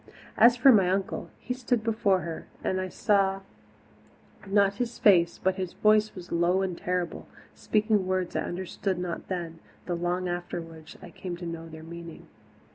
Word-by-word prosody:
As 240 +1 +6
for 265 +3 +7
my 195 -6 +5
uncle, 190 +1 -2
he 250 - -3
stood 245 -2 -1
before 215 -4 +2
her 165 -1 -6 0.2
and 185 0 0
I 185 - -4
saw 195 0 +1 1.1
not 200 0 +3
his 245 0 -3
face, 170 -5 +4
but 190 0 0
his 185 -2 -4
voice 215 0 +3
was 180 -2 -10
low 175 +3 +2
and 185 -2 -2
terrible, 180 0 -3 0.3
speaking 210 -3 +1
words 185 -1 -1
I - - +1
understood 185 +1 -3
not 180 -1 -4
then, 170 -3 -4 0.3
though 180 - -2
long 175 +1 -1
afterwards 170 -2 -6
I 175 - -10
came 175 -1 -6
to 175 - -7
know 165 -1 -6
their 160 0 -10
meaning. 170 0 -9
185 Hz, 170 wpm, -27 LUFS, 175-200 Hz, 1.1 s, for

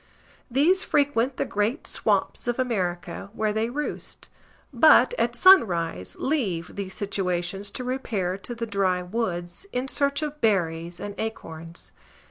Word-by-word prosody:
These 310 +10 +3
frequent 275 -3 +1
the - - 0
great 210 +8 -1
swamps - - 0
of 240 - 0
America, 185 -8 -2
where 215 -2 0
they 220 +2 0
roost; 295 +4 -5 0.4
but, 310 - +6
at - - +1
sunrise, 170 - +4
leave 210 - -1
these 190 -1 -5
situations 195 -1 -2
to 250 - -5
repair 220 -8 -2
to 240 +4 -7
the 230 0 -3
dry 190 -4 0
woods, 180 - -4
in 250 +2 -2
search 280 +2 0
of 300 0 -5
berries 170 -5 0
and 205 - -5
acorns. 165 -6 -7
210 Hz, 135 wpm, -25 LUFS, 180-255 Hz, 0.4 s, but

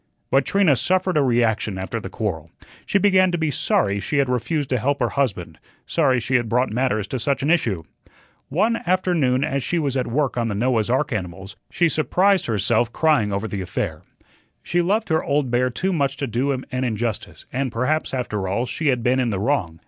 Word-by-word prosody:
But 135 0 +3
Trina 195 -8 +3
suffered 185 +6 +1
a 150 - +4
reaction 115 -6 +1
after 95 +5 -4
the 110 - -7
quarrel. 85 -7 -4 0.4
She - - +2
began 190 -2 +4
to 175 - 0
be 160 -2 0
sorry 100 -6 +1
she 100 +9 -2
had 140 -2 +2
refused 125 +4 -1
to 125 - +1
help 140 +4 0
her 120 -3 +1
husband, 100 - -2 0.3
sorry 135 -6 +2
she 120 +3 -4
had 120 -2 -3
brought 125 +2 +1
matters 110 -3 0
to 130 - -3
such 140 +3 -1
an 150 - +2
issue. 110 - +1 0.7
One 215 +11 +1
afternoon 170 -8 +2
as 140 -2 -1
she 175 - -1
was 140 -5 -1
at 130 - 0
work 135 +2 -1
on 120 -1 0
the 105 - -2
Noah's 115 0 +1
ark 135 +2 +1
animals, 95 -1 -5
she 170 - +2
surprised 180 +6 +2
herself 110 +2 +1
crying 150 -10 +2
over 100 +3 -2
the 100 -3 -4
affair. 90 - -3 0.6
She 175 - +1
loved 210 +5 0
her 160 0 +1
"old 140 -3 0
bear" 125 +1 +2
too 185 +9 -1
much 140 -4 0
to 140 - -2
do 130 +3 -1
him 130 -1 -3
an 130 0 -1
injustice, 110 -2 -3
and 130 -1 -1
perhaps, 130 +7 0
after 105 -7 -3
all, 110 +6 -1
she 155 +4 -3
had 125 -4 +1
been 125 +2 +2
in 125 -2 +1
the 100 -4 -2
wrong. 100 - -1
130 Hz, 210 wpm, -22 LUFS, 110-150 Hz, 0.7 s, a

